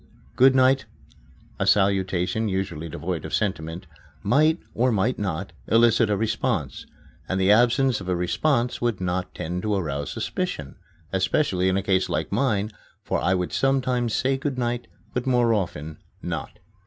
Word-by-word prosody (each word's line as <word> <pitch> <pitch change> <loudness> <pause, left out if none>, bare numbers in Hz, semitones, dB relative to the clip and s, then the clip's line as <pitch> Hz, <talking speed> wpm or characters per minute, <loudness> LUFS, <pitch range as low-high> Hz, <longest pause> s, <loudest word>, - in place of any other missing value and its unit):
"Good 130 +1 +6
night" 130 +1 +4 0.7
a - - 0
salutation 95 +1 +2
usually 95 -4 -3
devoid - - -4
of - - -2
sentiment 90 -3 -2 0.4
might, 155 - +3
or 125 +2 +2
might 110 +4 0
not, 95 -3 -3
elicit 115 0 +4
a 105 - +1
response, 110 - -2 0.4
and 95 - 0
the 95 +1 +4
absence 120 +1 +3
of 90 - -6
a 90 - +1
response 120 - 0
would 120 -5 0
not 90 0 -2
tend 90 +3 -3
to 105 0 0
arouse 70 -6 -2
suspicion 70 -3 -4 0.4
especially 95 -1 +1
in 95 - +1
a 100 - -1
case 95 -1 +1
like - - -2
mine, 110 -6 +1 0.3
for - - -1
I 90 +1 +2
would 90 -1 -2
sometimes 130 -4 +1
say 135 +1 +1
"good 135 -1 -3
night," 120 -1 -2 0.3
but 125 +1 -2
more 120 -2 +3
often 80 -6 -3 0.2
not. 80 -5 -5
105 Hz, 155 wpm, -24 LUFS, 90-125 Hz, 0.7 s, Good